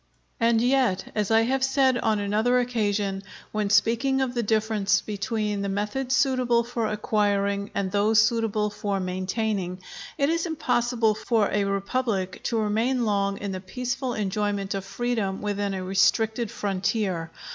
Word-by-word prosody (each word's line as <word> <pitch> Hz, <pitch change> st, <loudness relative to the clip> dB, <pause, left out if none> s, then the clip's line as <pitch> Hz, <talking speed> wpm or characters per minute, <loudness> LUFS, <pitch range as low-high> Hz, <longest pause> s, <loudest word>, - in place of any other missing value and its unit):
And 230 Hz, -1 st, +3 dB
yet, 250 Hz, -7 st, +1 dB
as 210 Hz, -2 st, -1 dB
I 225 Hz, 0 st, +5 dB
have 260 Hz, +3 st, 0 dB
said 265 Hz, -1 st, +3 dB
on 220 Hz, -2 st, +1 dB
another 215 Hz, +5 st, +1 dB
occasion, 205 Hz, -5 st, -1 dB, 0.3 s
when 210 Hz, -1 st, -1 dB
speaking 235 Hz, +6 st, +2 dB
of 260 Hz, -2 st, 0 dB
the 240 Hz, -, 0 dB
difference 215 Hz, -2 st, +1 dB
between 210 Hz, 0 st, -2 dB
the 200 Hz, -, -2 dB
methods 210 Hz, +7 st, -1 dB
suitable 255 Hz, -3 st, +2 dB
for 235 Hz, -1 st, -2 dB
acquiring 200 Hz, -1 st, 0 dB
and 190 Hz, -2 st, -1 dB
those 210 Hz, +2 st, +3 dB
suitable 220 Hz, -2 st, +1 dB
for 205 Hz, -1 st, -2 dB
maintaining, 185 Hz, 0 st, -2 dB, 0.4 s
it 280 Hz, -, +2 dB
is 335 Hz, +2 st, 0 dB
impossible 240 Hz, -7 st, +1 dB
for 220 Hz, -1 st, 0 dB
a 205 Hz, 0 st, +1 dB
republic 195 Hz, -1 st, -2 dB
to 230 Hz, -, 0 dB
remain 225 Hz, +4 st, +1 dB
long 200 Hz, -2 st, 0 dB
in 200 Hz, -1 st, -4 dB
the 185 Hz, -1 st, -5 dB
peaceful 245 Hz, +5 st, -3 dB
enjoyment 205 Hz, -1 st, -1 dB
of 195 Hz, -1 st, -4 dB
freedom 220 Hz, -3 st, -2 dB
within 205 Hz, -1 st, -2 dB
a 185 Hz, -, -4 dB
restricted 220 Hz, +4 st, +2 dB
frontier. 190 Hz, -4 st, -1 dB
215 Hz, 150 wpm, -25 LUFS, 200-240 Hz, 0.4 s, I